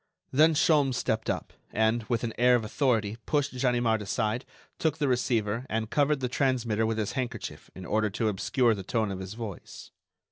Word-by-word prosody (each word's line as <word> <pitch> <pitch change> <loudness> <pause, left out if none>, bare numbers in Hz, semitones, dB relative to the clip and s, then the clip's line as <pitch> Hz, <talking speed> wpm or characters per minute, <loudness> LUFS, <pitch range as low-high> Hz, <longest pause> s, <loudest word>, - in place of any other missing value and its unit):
Then 155 +4 +5
Sholmes 145 -5 +3
stepped 110 -3 -1
up, - - -3 0.2
and, 110 +2 +2
with 120 -2 0
an 115 -2 -2
air 125 0 +6
of 115 -3 0
authority, 115 -3 0
pushed 145 -3 0
Ganimard 120 -3 +1
aside, 110 +4 -1 0.3
took 160 -1 +1
the 150 -2 0
receiver, 120 -2 0
and 110 0 -2
covered 145 -1 +2
the 125 - 0
transmitter 120 -4 +1
with 110 0 -1
his 110 -2 -1
handkerchief 130 -3 -5
in 95 - -8
order 110 +3 +1
to 110 +3 -1
obscure 115 +4 +2
the 100 - -5
tone 110 +2 -1
of 95 - -5
his 95 +2 -7
voice. 110 -5 -8
115 Hz, 185 wpm, -28 LUFS, 110-130 Hz, 0.3 s, air